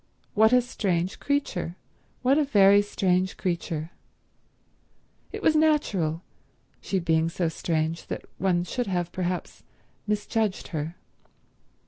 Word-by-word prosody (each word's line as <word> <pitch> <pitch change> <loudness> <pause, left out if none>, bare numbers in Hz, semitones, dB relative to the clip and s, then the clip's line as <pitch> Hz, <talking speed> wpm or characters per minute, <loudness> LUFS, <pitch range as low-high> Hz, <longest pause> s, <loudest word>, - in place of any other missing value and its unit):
What 220 +1 +5
a 250 -1 +5
strange 185 -7 -1
creature; 275 - -1 0.5
what 270 +4 +4
a - - +4
very 200 -6 +6
strange 185 -2 0
creature. 170 -3 -3 1.4
It - - -7
was 315 - +4
natural, 205 - +2 0.6
she 195 - -1
being 165 -2 +2
so 170 0 -1
strange, 160 0 -2
that - - -5
one 180 -2 +2
should 245 +7 -3
have, 175 -2 -1
perhaps, 180 -1 -3 0.5
misjudged 210 -1 -1
her. 160 +1 -4
185 Hz, 115 wpm, -26 LUFS, 170-220 Hz, 1.4 s, very